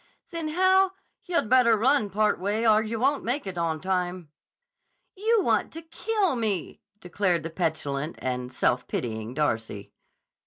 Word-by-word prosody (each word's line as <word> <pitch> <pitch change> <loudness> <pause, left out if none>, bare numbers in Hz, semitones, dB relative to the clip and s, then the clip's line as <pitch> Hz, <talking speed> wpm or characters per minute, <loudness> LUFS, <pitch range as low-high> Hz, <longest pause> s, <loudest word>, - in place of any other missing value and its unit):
"Then, 335 -2 -4
how—" 375 +3 +3 0.3
"Yah'd 340 -10 0
better 235 -2 +5
run 235 -1 +2
part 210 +1 +1
way, 210 +5 0
or 215 0 +5
yah 220 +1 -3
won't 275 +5 +1
make 255 +3 -1
it 190 -2 -5
on 165 -2 -1
time." 180 -2 -2 0.9
"You 435 +1 +2
want - - +1
to 330 +1 -8
kill 385 0 -1
me!" 215 -7 -2 0.2
declared 180 -2 0
the 165 - -5
petulant 155 -3 -2
and 125 -1 -3
self 125 -1 0
pitying 110 0 -4
Darcy. 115 -8 -2
205 Hz, 150 wpm, -26 LUFS, -, 0.9 s, better